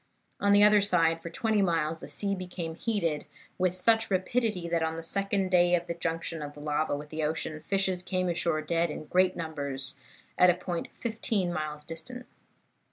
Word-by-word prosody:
On 200 Hz, 0 st, +4 dB
either 210 Hz, 0 st, +7 dB
side, 165 Hz, -4 st, +3 dB
for 170 Hz, -, -6 dB
twenty 215 Hz, +4 st, +1 dB
miles, 165 Hz, -3 st, 0 dB
the -, -, -9 dB
sea 200 Hz, -1 st, 0 dB
became 180 Hz, -3 st, -5 dB
heated, 170 Hz, -6 st, -1 dB, 0.3 s
with 180 Hz, -1 st, +2 dB
such 225 Hz, +4 st, +3 dB
rapidity 195 Hz, -1 st, 0 dB
that, 170 Hz, -1 st, 0 dB
on 160 Hz, 0 st, -1 dB
the 165 Hz, -, -6 dB
second 195 Hz, +1 st, 0 dB
day 175 Hz, -1 st, +5 dB
of 175 Hz, 0 st, -2 dB
the 170 Hz, -, -3 dB
junction 165 Hz, -1 st, -3 dB
of 145 Hz, 0 st, -6 dB
the -, -, -11 dB
lava 150 Hz, 0 st, 0 dB
with 150 Hz, +1 st, -9 dB
the 155 Hz, 0 st, -3 dB
ocean, 155 Hz, 0 st, -3 dB
fishes 190 Hz, -2 st, +1 dB
came 185 Hz, 0 st, -1 dB
ashore 170 Hz, -2 st, 0 dB
dead 170 Hz, +2 st, +1 dB
in 150 Hz, -, -6 dB
great 185 Hz, +3 st, +2 dB
numbers, 140 Hz, -5 st, -3 dB, 0.4 s
at 180 Hz, -, +7 dB
a 175 Hz, -, +4 dB
point 180 Hz, -1 st, -4 dB
fifteen 220 Hz, -5 st, -1 dB
miles 150 Hz, -2 st, -4 dB
distant. 205 Hz, +12 st, -8 dB
170 Hz, 185 wpm, -29 LUFS, 160-195 Hz, 0.4 s, either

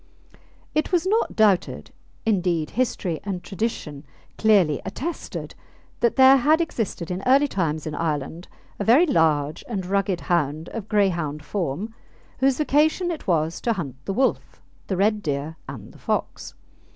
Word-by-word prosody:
It 305 Hz, +4 st, 0 dB
was 355 Hz, -1 st, +2 dB
not 435 Hz, +4 st, +1 dB
doubted 205 Hz, -5 st, +2 dB, 0.3 s
indeed, 180 Hz, -7 st, +1 dB
history 200 Hz, -8 st, -1 dB
and 190 Hz, -3 st, -4 dB
tradition 180 Hz, -8 st, -4 dB, 0.3 s
clearly 195 Hz, -10 st, +3 dB
attested 285 Hz, -, -5 dB, 0.5 s
that 235 Hz, -, +2 dB
there 265 Hz, 0 st, +8 dB
had 300 Hz, +5 st, +3 dB
existed 220 Hz, -, -3 dB
in 180 Hz, +1 st, -3 dB
early 275 Hz, +3 st, +5 dB
times 160 Hz, -, -2 dB
in 155 Hz, -, -4 dB
Ireland 160 Hz, +2 st, -3 dB, 0.3 s
a -, -, 0 dB
very 250 Hz, -, +6 dB
large 155 Hz, -, +1 dB
and 195 Hz, -6 st, -3 dB
rugged 195 Hz, -1 st, 0 dB
hound 160 Hz, -2 st, -1 dB
of 220 Hz, -3 st, -7 dB
Greyhound 170 Hz, -8 st, 0 dB
form, 195 Hz, +3 st, -3 dB, 0.5 s
whose 265 Hz, 0 st, +3 dB
vocation 310 Hz, +4 st, +2 dB
it 320 Hz, -, -7 dB
was 165 Hz, -2 st, 0 dB
to 235 Hz, -, +1 dB
hunt 150 Hz, -, -5 dB
the 195 Hz, -, -2 dB
wolf, 260 Hz, +6 st, 0 dB, 0.3 s
the 190 Hz, -, -1 dB
red 210 Hz, +2 st, +2 dB
deer, 145 Hz, -1 st, -3 dB
and -, -, -9 dB
the -, -, -17 dB
fox. -, -, -3 dB
195 Hz, 150 wpm, -24 LUFS, 160-245 Hz, 0.5 s, there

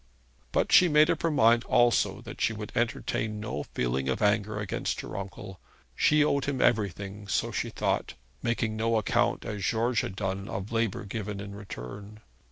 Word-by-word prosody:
But -, -, +1 dB
she 180 Hz, -, +8 dB
made 150 Hz, 0 st, +5 dB
up -, -, -2 dB
her 165 Hz, -, +2 dB
mind 115 Hz, -5 st, +4 dB
also 120 Hz, -1 st, +3 dB
that -, -, -9 dB
she 115 Hz, -, +2 dB
would 105 Hz, -1 st, -7 dB
entertain 110 Hz, -2 st, -1 dB
no 105 Hz, -9 st, -4 dB
feeling 65 Hz, +2 st, 0 dB
of 65 Hz, -, 0 dB
anger 105 Hz, 0 st, +1 dB
against 105 Hz, -3 st, -2 dB
her -, -, -8 dB
uncle. 95 Hz, -1 st, -7 dB, 0.4 s
She 150 Hz, 0 st, +4 dB
owed 140 Hz, -2 st, +1 dB
him 140 Hz, -2 st, -2 dB
everything, 100 Hz, -2 st, 0 dB
so 95 Hz, -, 0 dB
she -, -, -2 dB
thought -, -, -1 dB, 0.3 s
making 115 Hz, -2 st, -1 dB
no 115 Hz, +1 st, +1 dB
account, 110 Hz, -, +1 dB
as 105 Hz, -2 st, -4 dB
George 115 Hz, +4 st, +1 dB
had 95 Hz, -, -5 dB
done, 95 Hz, 0 st, -3 dB
of 100 Hz, +2 st, -5 dB
labour 115 Hz, -3 st, -1 dB
given 105 Hz, -1 st, -4 dB
in 100 Hz, 0 st, -7 dB
return. 100 Hz, -, -9 dB
105 Hz, 175 wpm, -28 LUFS, 100-115 Hz, 0.4 s, she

